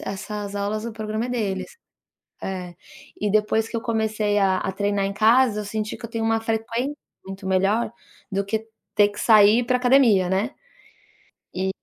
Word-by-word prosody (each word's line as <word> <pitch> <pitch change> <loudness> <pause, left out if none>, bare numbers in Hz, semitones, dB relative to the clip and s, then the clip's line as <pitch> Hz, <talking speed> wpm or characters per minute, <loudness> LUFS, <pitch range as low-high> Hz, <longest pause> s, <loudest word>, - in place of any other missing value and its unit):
essas 205 +1 -5
aulas 210 +2 -2
o 235 - -4
programa 215 +2 -3
é - - -8
deles, 210 - -3 0.7
eh, 180 -2 -5 0.4
e 210 - -1
depois 215 +1 +2
que 230 - -5
eu - - -1
comecei 220 -3 0
a 190 -2 +2
a 190 - -2
treinar 200 0 0
em 200 - -3
casa, 225 0 +4
eu - - -5
senti 215 +1 -3
que 235 - -15
eu 230 - -6
tenho 230 -1 -3
uma 225 0 +2
frequência 230 +5 -2 0.3
muito 195 0 -8
melhor 195 +5 +1 0.4
do 200 0 -1
que 220 +2 -3 0.3
ter 205 -1 +5
que 205 - -11
sair 215 +1 +6
pra 250 +1 +1
academia, 245 -8 +4
né, 195 +6 0 1.0
e 190 +1 -1
215 Hz, 180 wpm, -23 LUFS, 200-225 Hz, 1.0 s, sair